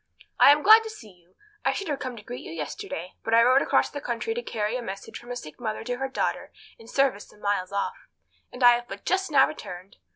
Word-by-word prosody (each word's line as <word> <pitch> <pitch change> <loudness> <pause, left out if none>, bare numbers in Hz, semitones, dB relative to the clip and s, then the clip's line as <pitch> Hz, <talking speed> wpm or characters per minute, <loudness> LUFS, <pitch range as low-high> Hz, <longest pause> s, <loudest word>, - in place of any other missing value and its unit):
"I - - +9
am 295 +1 +3
glad 440 +1 +9
to 445 - -7
see 230 - -12
you. 180 0 -27 0.3
I - - +2
should 395 - -4
have 290 -3 -2
come 255 -3 -5
to 210 - -11
greet 245 +3 -8
you - - -9
yesterday, 165 +2 -6
but 225 - +1
I 230 - +7
rode 255 +3 +5
across - - +2
the 285 - -6
country 245 - -2
to 480 - -3
carry 220 - -2
a 250 - -2
message 195 -4 -7
from 240 - -14
a 245 - -4
sick 155 -11 -9
mother 220 -3 -4
to 245 +1 -3
her 270 +1 -2
daughter - - -2 0.3
in 225 - -15
service 265 -5 +1
some - - -20
miles 200 -3 -1
off, 200 0 -3 0.4
and 250 - -5
have 240 0 +6
but 200 +1 -9
just 380 0 0
now 275 -3 +5
returned. 185 -10 -9
240 Hz, 250 wpm, -26 LUFS, 200-275 Hz, 0.4 s, I